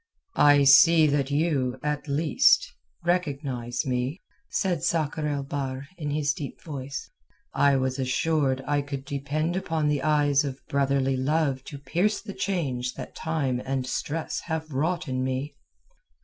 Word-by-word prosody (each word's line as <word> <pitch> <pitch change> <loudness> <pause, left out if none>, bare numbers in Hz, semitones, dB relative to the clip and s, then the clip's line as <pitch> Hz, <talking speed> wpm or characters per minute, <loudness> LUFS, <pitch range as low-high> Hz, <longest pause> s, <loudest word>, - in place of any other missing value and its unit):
"I 145 -1 +7
see 155 +4 +7
that 145 -2 +1
you, 140 -4 0
at 150 0 -2
least, 165 - +3 0.3
recognize 140 -7 -1
me," 130 +5 -1 0.3
said 180 -6 0
Sakr 155 -1 0
el 145 -2 -1
Bahr 135 -1 -4
in 150 -4 -4
his 145 0 +1
deep 145 -2 -7
voice. 140 -3 -6 0.4
"I 140 -1 +4
was 130 0 -1
assured 135 +1 +1
I 145 0 +1
could 140 -1 -6
depend 145 +5 -2
upon 160 -5 0
the 145 -2 0
eyes 145 -1 +3
of 135 -2 -5
brotherly 135 -1 +1
love 135 -1 0
to 145 - -8
pierce 175 +10 0
the 205 -3 -8
change 130 -12 -2
that - - -8
time 140 -6 -1
and 135 -1 -2
stress 155 +5 -3
have 160 -1 -3
wrought 160 +6 -1
in 130 -1 -1
me." 130 +3 -2
145 Hz, 150 wpm, -26 LUFS, 135-155 Hz, 0.4 s, I